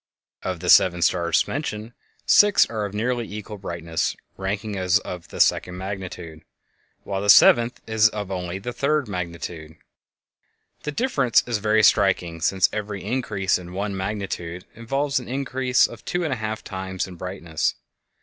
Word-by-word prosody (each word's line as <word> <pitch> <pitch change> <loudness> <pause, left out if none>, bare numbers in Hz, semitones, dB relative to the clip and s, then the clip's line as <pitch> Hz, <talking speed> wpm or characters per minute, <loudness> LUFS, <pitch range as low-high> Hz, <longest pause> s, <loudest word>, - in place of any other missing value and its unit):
Of 90 -3 -4
the 90 - -2
seven 90 -2 +5
stars 85 +1 +2
mentioned, 115 -6 -4 0.3
six 205 -1 +6
are 110 -2 -2
of 100 - -6
nearly 120 +1 -1
equal 105 0 -7
brightness, 85 -3 -3 0.2
ranking 100 +2 -3
as 95 +1 +3
of 90 -5 -7
the - - -9
second 90 0 +2
magnitude, 90 -4 -7 0.6
while 95 -1 -3
the 100 - -2
seventh 120 +3 +6
is 110 +1 +4
of 105 -3 -5
only 90 -1 -3
the 120 +5 -6
third 140 +2 0
magnitude. 85 -4 -6 1.1
The 150 - -4
difference 145 - +2
is 120 -3 -1
very 110 +1 +2
striking, 90 -6 +3
since 95 +2 +3
every 105 -2 -4
increase 100 -5 0
of 90 -1 -10
one 100 +2 -3
magnitude 95 -3 -4
involves 135 +4 -1
an 125 - -10
increase 130 -1 +1
of - - -8
two 175 0 -2
and 155 -5 -1
a - - -3
half 110 0 -4
times 95 -1 -4
in 95 - -10
brightness. 90 -3 -3
100 Hz, 160 wpm, -23 LUFS, 90-115 Hz, 1.1 s, six